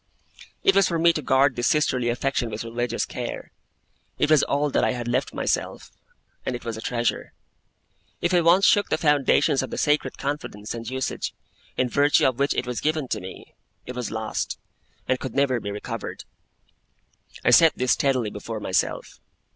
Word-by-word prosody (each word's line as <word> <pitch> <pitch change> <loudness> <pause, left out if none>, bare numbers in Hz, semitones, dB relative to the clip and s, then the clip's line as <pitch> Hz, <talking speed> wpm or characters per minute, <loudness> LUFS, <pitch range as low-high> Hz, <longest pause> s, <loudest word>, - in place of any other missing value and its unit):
It 390 - +4
was 195 - +5
for 170 - -1
me 170 +1 +4
to 155 - -3
guard 135 -1 +3
this 120 -1 0
sisterly 130 -5 +1
affection 125 0 -1
with 110 +1 -5
religious 120 +1 -2
care. - - -6 0.7
It 155 - +1
was 155 -2 +6
all 145 +1 0
that - - +2
I - - +2
had 120 -1 -5
left 125 +3 0
myself, - - -2 0.5
and 125 - -2
it 120 - -8
was 115 -1 -3
a 110 - -7
treasure. 120 0 -2 0.9
If 175 - 0
I 175 - +5
once 175 +4 +5
shook 205 - +4
the - - +1
foundations 145 -1 +3
of 130 - -5
the - - -5
sacred 150 0 +1
confidence 135 -7 -4
and 115 -1 -6
usage, 130 0 -3 0.4
in 130 - +2
virtue 145 +4 +3
of 130 -1 +1
which 140 +1 +1
it - - -1
was 125 -1 -4
given 155 -4 -1
to - - -2
me, 95 - -10 0.3
it 125 - -6
was 125 -2 -3
lost, 110 -1 -3 0.5
and 130 0 +1
could 130 -3 -6
never 135 -3 +2
be 100 - -5
recovered. 105 +1 -6 1.2
I - - +5
set 165 -1 +7
this 125 0 +1
steadily 130 -6 +1
before 110 +2 -6
myself. 95 -3 -2
130 Hz, 185 wpm, -24 LUFS, 120-145 Hz, 1.2 s, set